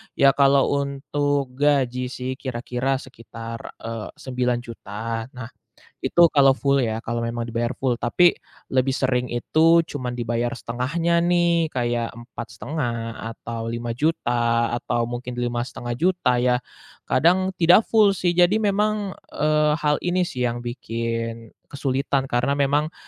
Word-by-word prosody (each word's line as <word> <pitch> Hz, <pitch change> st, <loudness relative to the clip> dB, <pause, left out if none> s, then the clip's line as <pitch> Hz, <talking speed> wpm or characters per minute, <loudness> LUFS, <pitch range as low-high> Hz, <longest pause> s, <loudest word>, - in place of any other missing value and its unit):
Ya, 140 Hz, 0 st, +6 dB
kalau 140 Hz, 0 st, +4 dB
untuk 140 Hz, 0 st, -1 dB
gaji 130 Hz, -2 st, +1 dB
sih 130 Hz, +1 st, -5 dB
kira-kira 125 Hz, +1 st, -2 dB
sekitar, 115 Hz, -3 st, -8 dB, 0.2 s
eee, 115 Hz, -1 st, -6 dB
Rp9.000.000. 115 Hz, -3 st, -3 dB
Nah, 120 Hz, -2 st, -7 dB, 0.6 s
itu 175 Hz, -, +3 dB
kalau 135 Hz, -2 st, +5 dB
full 140 Hz, +1 st, +1 dB
ya 110 Hz, 0 st, -2 dB
kalau 115 Hz, 0 st, -3 dB
memang 115 Hz, 0 st, -3 dB
dibayar 120 Hz, +1 st, -1 dB
full. 130 Hz, -3 st, -1 dB
Tapi 170 Hz, +9 st, +3 dB, 0.3 s
lebih 130 Hz, 0 st, +1 dB
sering 125 Hz, -2 st, 0 dB
itu 160 Hz, +7 st, +4 dB
cuman 130 Hz, -6 st, -5 dB
dibayar 120 Hz, 0 st, -1 dB
1/2-nya 165 Hz, +9 st, 0 dB
nih, 170 Hz, -2 st, +2 dB
kayak 120 Hz, -2 st, -1 dB
Rp4.500.000 120 Hz, 0 st, -5 dB, 0.2 s
atau 115 Hz, 0 st, -6 dB
Rp5.000.000 120 Hz, -1 st, 0 dB
atau 120 Hz, -2 st, -1 dB
mungkin 120 Hz, +1 st, -5 dB
Rp5.500.000 120 Hz, +5 st, 0 dB
ya. 125 Hz, 0 st, +2 dB, 0.5 s
Kadang 185 Hz, +4 st, +3 dB
tidak 175 Hz, +5 st, +6 dB
full 215 Hz, -3 st, +5 dB
sih. 175 Hz, -2 st, -1 dB
Jadi 180 Hz, +5 st, +4 dB
memang, 210 Hz, -1 st, 0 dB, 0.2 s
eee, 150 Hz, 0 st, +2 dB
hal 150 Hz, -1 st, +2 dB
ini 180 Hz, +1 st, +1 dB
sih 125 Hz, -8 st, -1 dB
yang 120 Hz, 0 st, -2 dB
bikin 115 Hz, -1 st, -4 dB, 0.2 s
kesulitan 135 Hz, -1 st, -1 dB
karena 125 Hz, +3 st, +1 dB
memang 145 Hz, +3 st, +1 dB
125 Hz, 125 wpm, -23 LUFS, 120-150 Hz, 0.6 s, Ya